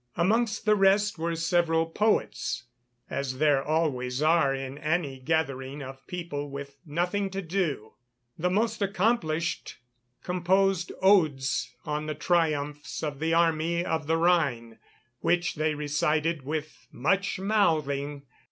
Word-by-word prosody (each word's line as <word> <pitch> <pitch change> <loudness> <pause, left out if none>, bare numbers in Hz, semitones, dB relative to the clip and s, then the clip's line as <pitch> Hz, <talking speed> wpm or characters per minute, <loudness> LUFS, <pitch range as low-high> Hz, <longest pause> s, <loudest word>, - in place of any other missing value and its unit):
Amongst 215 +5 +1
the 215 -1 +5
rest 200 -1 +3
were 165 +1 -1
several 165 -1 +2
poets, 165 - 0 0.4
as 135 -2 -3
there 145 -1 +3
always 140 -5 0
are 155 -2 +4
in 135 +1 -5
any 155 -4 -1
gathering 140 -2 -2
of 135 0 -10
people 165 -5 -5
with 140 0 -7
nothing 180 +6 -1
to 195 +1 -4
do. 160 - -2 0.4
The 180 +3 0
most 215 +4 0
accomplished 185 -5 0 0.5
composed 185 0 +1
odes 155 -9 +3
on 150 0 -2
the 155 - -3
triumphs 150 -3 -1
of 145 -3 -3
the 165 +1 +1
Army 170 +1 +2
of 160 -3 -2
the 165 +1 +2
Rhine, 140 -10 +1 0.4
which 175 0 +1
they 155 0 0
recited 150 +2 0
with 155 +1 -5
much 190 +10 0
mouthing. 150 -8 +1
160 Hz, 125 wpm, -27 LUFS, 145-180 Hz, 0.5 s, the